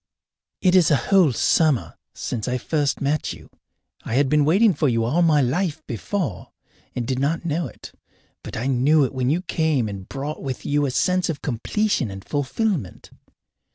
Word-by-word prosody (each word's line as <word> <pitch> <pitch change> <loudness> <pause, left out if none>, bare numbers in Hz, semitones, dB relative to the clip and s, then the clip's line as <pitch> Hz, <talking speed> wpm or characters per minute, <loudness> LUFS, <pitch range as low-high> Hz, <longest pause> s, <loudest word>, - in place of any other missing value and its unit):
It 185 -1 +4
is 180 -4 +5
a 150 - +5
whole 185 0 +3
summer 145 +2 +1 0.2
since 110 -4 -4
I 125 0 0
first 145 +3 -1
met 145 +2 -1
you. - - -13 0.6
I 115 - -3
had 135 0 +3
been 150 0 +3
waiting 195 +7 +4
for 145 -2 +1
you 115 -1 +1
all 140 +10 +1
my 155 -4 +4
life 160 +4 -1
before 125 - -3 0.5
and 125 - -2
did 130 +1 -2
not 160 +5 -1
know 165 -1 -1
it. - - -12 0.5
But - - -7
I 115 - -3
knew 135 +4 +3
it 130 - -5
when 130 -1 0
you 170 +5 0
came 160 -9 0
and 100 -2 -7
brought 145 +3 -5
with 130 -2 -5
you 145 0 +1
a - - -1
sense 180 +8 +1
of 155 -3 -4
completion 145 - -1
and 95 0 -9
fulfilment. 145 - -2
145 Hz, 185 wpm, -22 LUFS, 125-165 Hz, 0.6 s, is